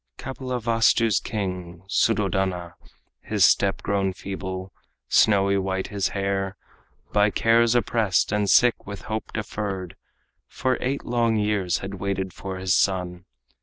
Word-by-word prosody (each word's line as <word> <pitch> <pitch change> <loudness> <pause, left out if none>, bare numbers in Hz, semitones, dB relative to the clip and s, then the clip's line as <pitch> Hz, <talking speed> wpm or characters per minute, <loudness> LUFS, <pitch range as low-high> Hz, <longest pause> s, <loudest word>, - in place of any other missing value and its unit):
Kapilavastu's 115 -4 +1
king, 90 -5 -5
Suddhodana, 95 -5 0 0.5
His - - +3
step 100 -1 +2
grown 100 -1 0
feeble, 95 -1 -6 0.4
snowy 100 -2 +4
white 95 0 -2
his 100 -3 0
hair, 100 0 -2 0.6
By 105 0 +4
cares 115 +2 +3
oppressed 115 -6 +1
and 105 -1 +1
sick 120 0 +4
with 100 -1 -7
hope 110 0 -4
deferred, 100 -4 -4 0.5
For 130 -1 -1
eight 135 +2 -2
long 115 -1 +1
years 105 -4 +1
had 100 0 -7
waited 95 -1 -2
for 95 -1 -6
his 95 0 0
son. 90 -2 0
100 Hz, 125 wpm, -24 LUFS, 95-110 Hz, 0.6 s, snowy